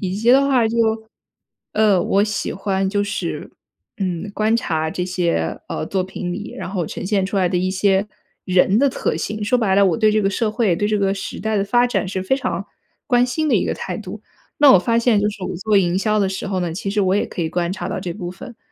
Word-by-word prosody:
以 190 -1 -2
及 225 +4 +2
的 275 +2 +5
话 255 -4 +3
就 230 - -3 1.0
呃， 210 -4 +3
我 200 +1 +2
喜 210 -2 -3
欢 195 0 -1
就 205 +1 0
是， 200 - -4 0.5
嗯， 185 +1 -3
观 215 +2 +1
察 160 -8 -1
这 180 - -3
些， 175 - -1
呃， 75 - -3
作 190 -1 -1
品 180 -1 -5
里 205 +4 -6
然 - - -6
后 180 -5 -2
呈 - - -6
现 195 0 +1
出 200 +1 -4
来 185 -2 +2
的 180 -1 0
一 185 +1 0
些 195 +1 +2 0.4
人 190 +2 +3
的 280 - +4
特 265 - -2
性。 210 0 -3
说 250 +4 +2
白 195 -5 +2
了， 200 0 +5
我 185 - +1
对 215 -2 +3
这 215 - +2
个 195 - +2
社 225 +2 0
会、 215 -6 +1
对 205 - 0
这 210 0 +1
个 195 -1 +1
时 195 - -6
代 220 -1 -1
地 195 - +1
发 240 +4 +3
展 220 - -1
是 190 0 -3
非 265 +8 +1
常 - - -3 0.4
关 245 -1 +4
心 310 +5 -1
的 235 - +4
一 - - +1
个 - - -1
态 180 - -5
度。 210 +1 -8 0.4
那 290 -2 +8
我 190 - +7
发 230 +5 +1
现 230 -3 +3
就 210 - +1
是 205 -2 -7
我 - - -4
做 210 +3 +1
营 180 -1 +2
销 215 +1 +1
的 195 - +2
时 190 - -4
候 190 -2 -1
呢， 175 -2 -2
其 195 +4 -4
实 205 0 +1
我 190 +1 +2
也 205 - +1
可 175 - -4
以 160 - -1
观 175 -1 -1
察 185 -2 -5
到 - - -3
这 175 - -4
部 175 -1 -5
分， 230 +6 -11
200 Hz, 275 characters per minute, -20 LUFS, 185-215 Hz, 1.0 s, 那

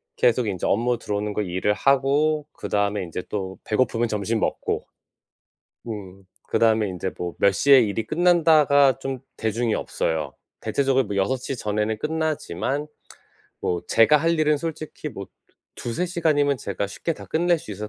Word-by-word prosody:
계속 120 -1 +2
인제 95 -4 -2
업무 120 +4 +1
들어오는 105 -1 -3
거 105 - -1
일을 95 +2 0
하고 140 +5 +2
그다음에 100 -1 -1
인제 90 +1 -5
또 95 -2 -4
배고프면 115 +1 +1
점심 110 +1 -1
먹고. - - -1 1.0
음 100 -3 -7 0.2
그다음에 110 -2 +3
인제 95 0 -4
뭐 90 -1 -4
몇 100 - +5
시에 140 +5 +6
일이 110 0 -1
끝난다가 155 -4 +4
좀 135 -1 -4 0.2
대중이 110 +1 0
없어요. 75 -9 -2 0.3
대체적으로 135 -2 +1
뭐 100 - -4
6:00 130 +7 -1
전에는 105 0 -1
끝나지만 150 - -2 0.7
뭐 90 -1 -1
제가 115 +7 +6
할 165 +2 +1
일은 150 -1 +3
솔직히 155 0 -5
뭐 100 -8 -8 0.5
두 - - -6
두세 175 +10 -1
시간이면 150 -5 +1
제가 100 -3 -3
쉽게 165 +11 -3
다 - - -11
끝낼 175 +1 +2
수 110 - -8
있어서 105 +2 -6
115 Hz, 320 characters per minute, -24 LUFS, 100-145 Hz, 1.0 s, 시에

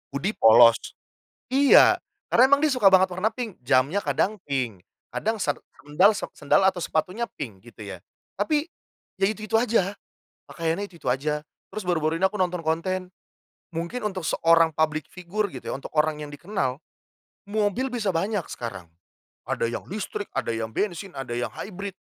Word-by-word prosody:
hoodie 185 +9 0
polos 115 +1 +7 0.7
iya, 275 +1 +6 0.3
karena 255 +2 +6
emang 280 +2 +4
dia 300 - +3
suka 215 -7 +5
banget 190 -1 +5
warna 185 +5 +1
pink. 225 - -7
Jamnya 130 +8 +2
kadang 205 0 0
pink, 125 -9 -2 0.3
kadang 220 +1 -1
ser 150 -9 -1 0.2
sendal, 190 +9 +4
se - - -4
sendal, - - +2
atau 190 -2 +2
sepatunya 185 +9 -1
pink, 110 -10 -7
gitu 110 -2 -11
ya, 95 -3 -8 0.4
Tapi, 295 +8 +1 0.6
ya 195 - +4
itu-itu 215 +1 -5
aja, 210 -5 +1 0.5
pakaiannya 165 +4 -2
itu-itu 170 -9 -4
aja. 150 +3 -1 0.3
Terus 215 - -3
baru-baru 165 -3 0
ini - - +5
aku 210 - -6
nonton 180 -2 0
konten, 180 +3 -1 0.6
mungkin 170 +9 -4
untuk 190 -3 -2
seorang 165 0 +4
public 155 -1 0
figure 195 +4 -3
gitu - - -7
ya, - - -1
untuk 135 - -7
orang 150 0 +2
yang 150 - -6
dikenal, 145 -4 -3 0.7
mobil 215 +5 0
bisa 215 -5 -1
banyak 195 +3 0
sekarang, 115 -8 -7 0.6
ada - - -1
yang 115 0 -2
listrik, 205 +1 -4 0.2
yang 115 -1 -2
bensin, 195 -3 -3
ada 135 -3 -5
yang 120 0 -1
hybrid. 195 +3 -7
180 Hz, 160 wpm, -25 LUFS, 150-205 Hz, 0.7 s, polos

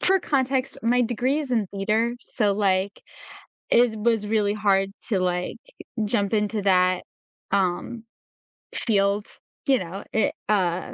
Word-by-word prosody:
for 385 +1 +4
context, 265 -4 0
my 245 +2 +3
degree 245 +4 0
is 285 -4 -6
in 225 -5 +1
theater, 215 +5 0
so, 210 -4 0
like, 195 -1 0 0.7
it 240 -1 +4
was 225 -1 +1
really 210 -1 +1
hard 195 -2 +2 0.2
to, 200 -5 +1
like, 180 0 -1 0.5
jump 205 -1 0
into 210 0 0
that, 185 -2 +3 0.5
um, 195 +4 0 0.7
field, 200 -1 +1 0.4
you 265 -2 +4
know, 185 +3 -6
it 220 - +2 0.2
uh, 185 -4 0
210 Hz, 130 wpm, -24 LUFS, 195-235 Hz, 0.7 s, for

